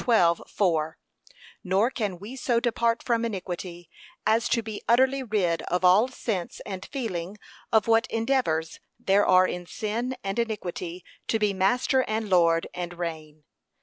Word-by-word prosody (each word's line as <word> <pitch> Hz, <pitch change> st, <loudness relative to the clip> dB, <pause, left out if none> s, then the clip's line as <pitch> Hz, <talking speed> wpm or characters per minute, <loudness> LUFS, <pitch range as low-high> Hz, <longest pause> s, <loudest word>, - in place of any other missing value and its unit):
12:4) 170 Hz, -6 st, +2 dB, 0.7 s
Nor 200 Hz, +6 st, +2 dB
can 205 Hz, -8 st, -3 dB
we 205 Hz, +8 st, -9 dB
so 240 Hz, -2 st, +1 dB
depart 235 Hz, -1 st, 0 dB
from 235 Hz, -2 st, +1 dB
iniquity, 180 Hz, -5 st, -5 dB, 0.4 s
as 225 Hz, +2 st, +2 dB
to 230 Hz, -, +1 dB
be 215 Hz, -1 st, -6 dB
utterly 260 Hz, +3 st, +4 dB
rid 200 Hz, -9 st, 0 dB
of 180 Hz, +1 st, 0 dB
all 195 Hz, +7 st, +6 dB
sense 220 Hz, -8 st, -4 dB
and 190 Hz, -1 st, -6 dB
feeling 205 Hz, -8 st, -4 dB, 0.3 s
of 220 Hz, -2 st, +4 dB
what 225 Hz, +2 st, +4 dB
endeavours 225 Hz, -10 st, 0 dB, 0.2 s
there 200 Hz, +1 st, +3 dB
are 185 Hz, 0 st, +6 dB
in 175 Hz, 0 st, -5 dB
sin 230 Hz, +7 st, -3 dB
and 195 Hz, +3 st, -2 dB
iniquity 185 Hz, -6 st, -4 dB, 0.2 s
to 225 Hz, -, +2 dB
be 210 Hz, -2 st, +1 dB
master 245 Hz, +7 st, +2 dB
and 215 Hz, -1 st, -2 dB
lord, 165 Hz, -2 st, +4 dB
and 175 Hz, 0 st, -5 dB
reign. 155 Hz, -3 st, -6 dB
205 Hz, 150 wpm, -26 LUFS, 175-230 Hz, 0.7 s, all